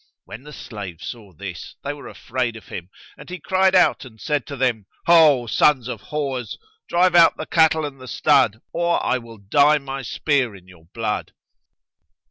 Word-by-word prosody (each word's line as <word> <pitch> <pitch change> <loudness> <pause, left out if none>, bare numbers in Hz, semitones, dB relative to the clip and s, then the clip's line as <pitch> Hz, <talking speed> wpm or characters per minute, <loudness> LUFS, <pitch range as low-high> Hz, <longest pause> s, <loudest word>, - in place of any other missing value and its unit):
When 110 - -10
the 150 +2 -12
slaves 100 - -8
saw 110 -5 -9
this, 90 -1 -8
they 145 - -3
were 145 - -11
afraid 125 -2 -3
of 110 - -13
him, 90 0 -7 0.3
and - - -12
he 180 - -5
cried 190 +3 +2
out 180 - +4
and 115 -4 -14
said 150 +1 -2
to 140 - -6
them, 120 -6 0 0.2
"Ho, 155 -7 +6
sons 125 +2 +2
of 125 - -6
whores, 135 -5 -4 0.3
drive 180 +1 +3
out 170 -1 +6
the 155 - -5
cattle 160 -1 +3
and 135 -2 -8
the 130 - -10
stud 120 -2 +2
or 170 0 0
I 130 - +1
will 115 -1 -13
dye 145 +9 +3
my 135 -1 -6
spear 130 -3 0
in 95 -1 -16
your 90 -3 -18
blood." 105 +4 -4
130 Hz, 185 wpm, -22 LUFS, 110-150 Hz, 0.3 s, Ho